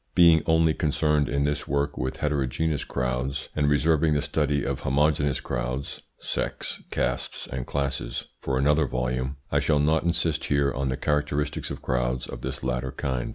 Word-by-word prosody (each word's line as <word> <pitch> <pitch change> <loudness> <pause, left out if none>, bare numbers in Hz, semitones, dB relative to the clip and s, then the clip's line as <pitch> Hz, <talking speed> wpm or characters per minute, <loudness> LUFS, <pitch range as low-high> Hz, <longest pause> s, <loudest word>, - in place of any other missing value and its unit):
Being 85 -3 +7
only 80 -1 +4
concerned 75 -1 +1
in 70 +1 +1
this 75 0 -1
work 70 +1 0
with 65 - -3
heterogeneous 75 +1 0
crowds, 60 +3 -2
and 75 -1 +2
reserving 75 +1 +3
the 75 - +1
study 75 -1 0
of 70 -1 -2
homogeneous 70 0 +2
crowds 65 +3 -3 0.2
(sects, - - -3
castes, - - -2
and 65 0 -5
classes) 65 -4 -2
for 65 -1 -1
another 75 +2 +3
volume, 65 +2 -2
I - - +3
shall 75 - +2
not 80 +2 +3
insist 85 -2 0
here 70 -1 +2
on 70 +1 -1
the 65 - -1
characteristics 75 -1 -1
of - - -6
crowds 60 0 0
of - - -8
this - - -5
latter 65 +1 -1
kind. 65 -2 -2
70 Hz, 165 wpm, -26 LUFS, 65-75 Hz, 0.2 s, Being